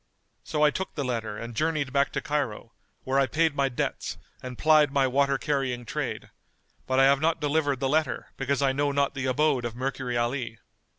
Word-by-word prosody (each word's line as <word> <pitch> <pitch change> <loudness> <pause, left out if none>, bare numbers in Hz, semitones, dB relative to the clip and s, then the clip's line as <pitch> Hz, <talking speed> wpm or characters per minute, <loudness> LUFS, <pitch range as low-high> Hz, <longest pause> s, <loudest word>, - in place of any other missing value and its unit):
So 150 - -1
I 150 - +6
took 190 +6 -4
the 145 - -2
letter 115 -4 -3
and 115 +1 -6
journeyed 150 -2 0
back 140 0 +2
to - - -1
Cairo, 130 -6 -3 0.3
where 135 +1 +1
I 135 - +3
paid 160 +2 +2
my 140 -1 +2
debts 125 - -3 0.2
and 125 -1 -7
plied 155 -2 +5
my 140 -1 +3
water 140 +1 +2
carrying 135 -4 -1
trade; - - -4 0.6
but 130 0 +2
I - - +7
have 140 +1 +4
not 160 +1 +2
delivered 145 -2 +1
the 135 - 0
letter, 155 +3 0
because 140 +1 -1
I 135 - +3
know 145 +1 +1
not 140 0 +1
the 135 -1 -3
abode 135 0 +2
of 120 -1 -4
Mercury 130 -1 -2
Ali." 120 -1 -2
135 Hz, 200 wpm, -27 LUFS, 125-145 Hz, 0.6 s, I